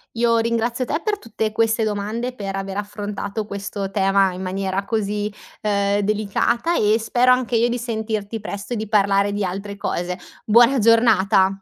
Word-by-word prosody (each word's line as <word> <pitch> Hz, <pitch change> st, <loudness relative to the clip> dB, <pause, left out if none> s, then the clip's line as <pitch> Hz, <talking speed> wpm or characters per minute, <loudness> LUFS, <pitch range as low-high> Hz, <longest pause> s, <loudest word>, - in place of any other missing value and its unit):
Io 230 Hz, 0 st, +3 dB
ringrazio 235 Hz, +2 st, 0 dB
te 305 Hz, -, -1 dB
per 420 Hz, -1 st, -1 dB
tutte 220 Hz, -, -3 dB
queste 225 Hz, +1 st, +1 dB
domande, 215 Hz, +4 st, -2 dB
per 195 Hz, -5 st, -5 dB
aver 195 Hz, 0 st, -4 dB
affrontato 205 Hz, 0 st, -4 dB
questo 200 Hz, -1 st, -5 dB
tema 195 Hz, -1 st, +2 dB
in 180 Hz, -, -7 dB
maniera 190 Hz, +1 st, -2 dB
così, 210 Hz, 0 st, -2 dB, 0.3 s
uhm, 200 Hz, -1 st, +1 dB
delicata 215 Hz, -, 0 dB
e 215 Hz, -3 st, +3 dB
spero 245 Hz, +3 st, +3 dB
anche 250 Hz, -1 st, +2 dB
io 235 Hz, +1 st, +3 dB
di 240 Hz, -, -1 dB
sentirti 220 Hz, -2 st, -3 dB
presto 205 Hz, +2 st, -6 dB
e -, -, -1 dB
di 220 Hz, -1 st, -4 dB
parlare 200 Hz, -1 st, +3 dB
di 205 Hz, 0 st, -1 dB
altre 200 Hz, +2 st, -5 dB
cose. 180 Hz, -2 st, -3 dB, 0.3 s
Buona 240 Hz, +4 st, +5 dB
giornata. 205 Hz, -4 st, +4 dB
210 Hz, 165 wpm, -21 LUFS, 200-230 Hz, 0.3 s, Buona